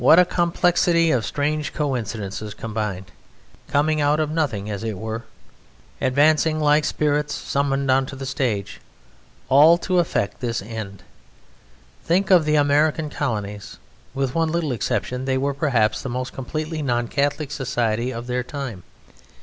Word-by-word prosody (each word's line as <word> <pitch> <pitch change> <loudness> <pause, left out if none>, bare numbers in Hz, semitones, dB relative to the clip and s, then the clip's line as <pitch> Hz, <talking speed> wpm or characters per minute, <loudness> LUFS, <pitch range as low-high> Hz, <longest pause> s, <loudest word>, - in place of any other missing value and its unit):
What 145 +6 +7
a 180 - +7
complexity 170 -1 +2
of 120 -6 +1
strange 150 +1 -1
coincidences 110 -7 -3
combined, 105 -5 -4 0.6
coming 150 +1 +1
out 145 +1 +2
of 155 -1 0
nothing 140 -11 -1
as 105 0 -4
it 110 -3 -3
were, 110 +2 -5 0.8
advancing 155 +4 +3
like 150 0 +3
spirits 150 -1 0
summoned 140 -1 0
on 130 0 +2
to 140 - -7
the 135 0 -6
stage, 120 -7 -2 0.7
all 150 +5 +7
to 180 +1 0
effect 105 - -1
this 120 -2 -2
end! 100 -2 -7 1.0
Think 190 +4 +1
of 175 -4 +6
the 150 0 +2
American 150 +1 +2
Colonies; 105 -8 -4 0.4
with 135 -2 -1
one 165 -1 +1
little 165 -4 -1
exception 125 +2 -2
they 130 -1 +1
were 140 +2 0
perhaps 120 -7 +1
the 135 - -5
most 125 +1 -4
completely 155 +4 -4
non 120 -4 0
Catholic 145 +2 -1
society 120 -4 -1
of 120 -1 -6
their 125 0 -1
time. 125 -7 -6
135 Hz, 150 wpm, -22 LUFS, 115-155 Hz, 1.0 s, What